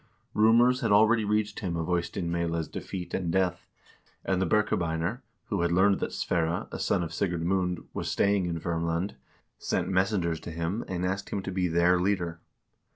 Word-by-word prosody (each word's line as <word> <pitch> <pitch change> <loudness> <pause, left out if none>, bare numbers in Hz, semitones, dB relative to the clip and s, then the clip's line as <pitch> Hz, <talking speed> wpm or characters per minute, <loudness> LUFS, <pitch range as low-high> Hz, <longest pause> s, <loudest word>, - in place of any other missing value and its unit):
Rumors 120 +4 +5
had - - +1
already 110 +2 +5
reached 105 0 0
him 90 -4 -2
of 80 - -2
Eystein 85 0 -1
Meyla's 85 -2 -1
defeat 90 -2 -6
and 85 -3 -1
death, 90 -1 0 0.6
and 95 -1 +1
the 95 - +1
Birkebeiner, 90 +1 0 0.3
who - - 0
had 85 0 +1
learned 95 +3 +4
that - - -2
Sverre, 85 0 -1
a - - -5
son 90 - +1
of 85 - -5
Sigurd 90 -4 -1
Mund, 90 -2 0
was - - -3
staying 100 -2 +2
in 85 -1 -2
Verm 85 0 -2
land, 85 +5 -1 0.5
sent - - -1
messengers 95 -3 +1
to - - -8
him 85 +6 -2
and 90 -1 -2
asked 95 +1 -2
him 100 - -3
to 95 - -4
be 90 -1 0
their 85 +2 +3
leader. 90 -3 -1
90 Hz, 185 wpm, -28 LUFS, 85-100 Hz, 0.6 s, Rumors